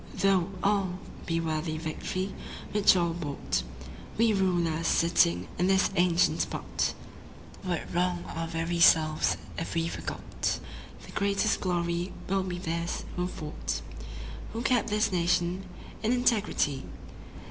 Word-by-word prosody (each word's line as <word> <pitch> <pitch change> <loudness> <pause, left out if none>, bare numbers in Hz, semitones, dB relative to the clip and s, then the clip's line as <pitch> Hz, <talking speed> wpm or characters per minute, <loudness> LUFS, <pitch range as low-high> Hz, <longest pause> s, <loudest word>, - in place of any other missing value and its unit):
Though 195 -2 +3
all 195 -3 +2 0.3
be 165 0 +1
worthy 155 -1 -1
Victory 180 +4 -3 0.4
which 205 -2 +5
all 170 -2 +2
bought, 140 - -2 0.6
We 225 0 +4
rulers 170 -4 +1
sitting 90 - +3
in 180 - +3
this 190 +1 +3
ancient 175 -1 +3
spot - - -1 0.7
Would 175 -3 -3
wrong 175 0 +1
our 165 0 -2
very 165 +1 -2
selves 155 -2 +5 0.2
if 165 - -4
we 165 0 +1
forgot - - -3 0.5
The - - -11
greatest 200 +2 +1
glory 175 0 -1
will 195 +1 +2
be 185 -1 -3
theirs 170 -1 -3
who 180 0 0
fought, 155 -4 -4 0.7
Who 230 +1 -3
kept 245 -4 +2
this 210 0 +2
nation 175 +1 +1 0.4
in 225 +2 +2
integrity." 215 - +1
175 Hz, 125 wpm, -29 LUFS, 165-195 Hz, 0.7 s, which